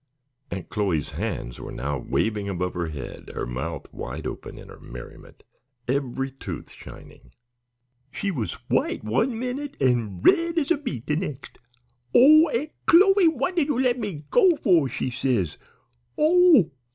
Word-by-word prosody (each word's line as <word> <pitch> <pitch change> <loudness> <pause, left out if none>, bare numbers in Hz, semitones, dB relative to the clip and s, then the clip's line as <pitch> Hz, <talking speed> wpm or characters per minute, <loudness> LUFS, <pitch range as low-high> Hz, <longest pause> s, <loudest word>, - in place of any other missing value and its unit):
Aunt 95 - -6
Chloe's 95 -9 -1
hands - - -4
were - - -7
now 70 +3 -3
waving 105 - -1
above 90 -1 -2
her 85 -1 -2
head, 70 -5 -8
her - - -3
mouth 70 +6 -5
wide - - -6
open - - -6
in - - -11
her - - -13
merriment, - - -12 0.4
every 135 0 -1
tooth 135 - -8
shining. - - -14 0.8
"She 200 +8 -3
was 125 - -3
white - - 0
one 225 - 0
minute 255 +4 -4
an' 120 -8 +1
red 335 0 +4
as 310 -1 +1
a 340 - +4
beet 130 - -5
the 150 - 0
nex'. 150 -6 -5 0.6
'Oh, 310 +5 +7
Aunt 295 +4 -2 0.2
Chloe, 385 +1 +6
what 310 +2 0
did 320 -5 +2
you 290 -5 0
let 250 -1 +2
me 185 -10 -5
go 380 -8 +5
for?' 175 - +3
she 130 - -3
says. 120 - -1 0.6
'Oh! 320 - +5
150 Hz, 155 wpm, -24 LUFS, -, 0.8 s, Oh